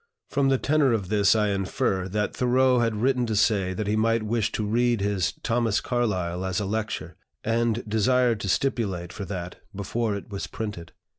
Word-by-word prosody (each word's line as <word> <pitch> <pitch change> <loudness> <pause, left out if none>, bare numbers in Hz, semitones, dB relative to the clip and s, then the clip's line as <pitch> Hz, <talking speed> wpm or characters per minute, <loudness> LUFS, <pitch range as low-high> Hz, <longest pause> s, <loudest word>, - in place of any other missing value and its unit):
From 140 -1 +2
the 135 - +3
tenor 140 -2 +2
of 100 -5 -2
this 105 0 +4
I 105 -1 +2
infer 95 -1 -1
that 105 +2 -2
Thoreau 125 0 +3
had 115 -2 +1
written 130 -2 +2
to 110 - -1
say 100 -3 +2
that 105 - -2
he 105 +1 0
might 115 +1 +2
wish 110 0 0
to 110 - -1
read 120 +2 +2
his 100 -2 0
"Thomas 115 -3 +1
Carlyle" 95 -8 -1
as 95 0 -1
a 105 - -2
lecture, 110 +2 -3 0.3
and 115 0 0
desired 120 +2 +2
to 100 - -3
stipulate 95 -8 -1
for 100 - -5
that 90 -2 -6 0.2
before 105 +2 -1
it 100 +1 -8
was 100 - -4
printed. 100 -7 -6
110 Hz, 190 wpm, -25 LUFS, 100-120 Hz, 0.3 s, this